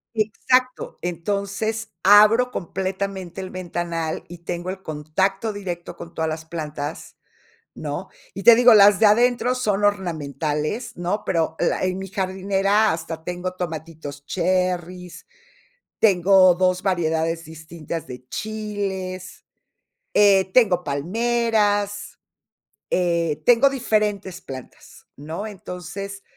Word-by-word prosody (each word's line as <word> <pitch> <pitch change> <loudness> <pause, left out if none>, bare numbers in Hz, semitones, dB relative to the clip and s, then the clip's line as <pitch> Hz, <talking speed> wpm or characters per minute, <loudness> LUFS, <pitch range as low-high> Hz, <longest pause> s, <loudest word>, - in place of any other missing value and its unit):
Exacto, 250 +4 0
entonces, 200 +5 -3
abro 215 +5 +6
completamente 190 -1 -4
el 185 - -7
ventanal 170 -3 -3
y 175 0 -10
tengo 175 +1 -4
el 190 0 -8
contacto 190 +7 -1
directo 180 -4 -6
con 170 0 -11
todas 160 - -1
las 160 0 -5
plantas, 155 -2 -6 0.6
¿no?, - - -5 0.2
y - - -7
te 235 - +9
digo, 245 +1 +7
las 205 -2 +7
de - - +3
adentro 245 +3 +3
son 210 -5 0
ornamentales, 155 - -2
¿no?, 180 +5 -2
pero 165 -3 0
la 170 - 0
en 185 0 -1
mi 195 0 -6
jardinera 195 +2 +1
hasta 160 0 -5
tengo 180 +2 -4
tomatitos 160 -5 -7
cherris, 180 0 -2 0.7
tengo 190 -2 +5
2 185 0 +1
variedades 165 -3 0
distintas 160 0 -7
de 125 0 -10
chiles, 200 -4 -5 0.7
eh, 195 -2 +4
tengo 195 -8 +4
palmeras, 205 +5 0 0.7
eh, 170 -4 0
tengo 245 +3 +6
diferentes 210 -7 -1
plantas, 130 -6 -11
¿no?, 160 +8 -6
entonces, 195 0 -7
185 Hz, 110 wpm, -22 LUFS, 165-205 Hz, 0.7 s, te